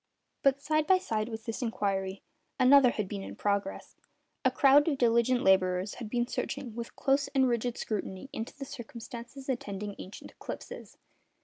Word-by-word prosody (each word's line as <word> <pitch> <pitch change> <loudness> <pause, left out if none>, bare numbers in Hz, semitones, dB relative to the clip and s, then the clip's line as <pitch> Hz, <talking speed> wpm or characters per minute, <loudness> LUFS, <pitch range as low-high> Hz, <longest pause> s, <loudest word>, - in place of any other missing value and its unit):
But, 275 0 +3
side 310 +1 +1
by 375 - +6
side 220 -10 -2
with 220 -1 -7
this 225 +2 -4
inquiry, 195 -4 -2 0.4
another 260 0 +7
had 215 -4 -2
been 200 0 -5
in - - -7
progress. 200 -1 -2 0.5
A - - +5
crowd 285 +2 +5
of 295 -4 +1
diligent 240 0 +3
labourers 185 0 +3
had 230 -4 -6
been 240 +1 +1
searching 255 0 -4
with 235 0 -6
close 275 0 +2
and 265 -1 +5
rigid 240 0 -1
scrutiny 200 +1 -4
into 225 +5 -5
the 275 - -6
circumstances 240 +1 -9
attending 210 -5 -3
ancient 190 - -9
eclipses. - - -8
235 Hz, 165 wpm, -30 LUFS, 205-270 Hz, 0.5 s, another